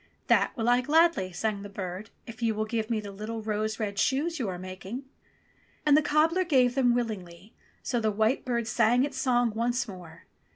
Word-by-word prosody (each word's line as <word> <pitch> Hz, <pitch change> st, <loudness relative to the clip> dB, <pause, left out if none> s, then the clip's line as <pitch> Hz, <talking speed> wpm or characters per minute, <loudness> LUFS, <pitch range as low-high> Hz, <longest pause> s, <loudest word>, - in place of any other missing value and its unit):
"That -, -, +3 dB
will 225 Hz, 0 st, -1 dB
I 245 Hz, +1 st, +4 dB
gladly," 310 Hz, -, +3 dB
sang 200 Hz, +3 st, -2 dB
the 205 Hz, -, -8 dB
bird, 195 Hz, +1 st, -6 dB, 0.2 s
"if 230 Hz, 0 st, -10 dB
you 225 Hz, -2 st, +1 dB
will 215 Hz, +1 st, -1 dB
give 220 Hz, 0 st, -2 dB
me 225 Hz, -2 st, 0 dB
the 205 Hz, -1 st, -7 dB
little 215 Hz, +3 st, -6 dB
rose 215 Hz, +1 st, -2 dB
red 205 Hz, -2 st, -2 dB
shoes 310 Hz, +7 st, +1 dB
you 230 Hz, -6 st, -1 dB
are 180 Hz, -, -4 dB
making." 185 Hz, +7 st, -7 dB, 0.8 s
And 295 Hz, -1 st, +6 dB
the 305 Hz, -, +5 dB
cobbler 320 Hz, +5 st, +2 dB
gave 260 Hz, -8 st, +3 dB
them 245 Hz, -3 st, +3 dB
willingly, 205 Hz, -4 st, -5 dB, 0.3 s
so 240 Hz, -, 0 dB
the 220 Hz, -1 st, +1 dB
white 220 Hz, +5 st, +1 dB
bird 235 Hz, -2 st, -1 dB
sang 240 Hz, +1 st, +3 dB
its 275 Hz, -1 st, -3 dB
song 245 Hz, -3 st, +2 dB
once 240 Hz, +3 st, -1 dB
more. 175 Hz, -5 st, -11 dB
225 Hz, 200 wpm, -28 LUFS, 205-250 Hz, 0.8 s, And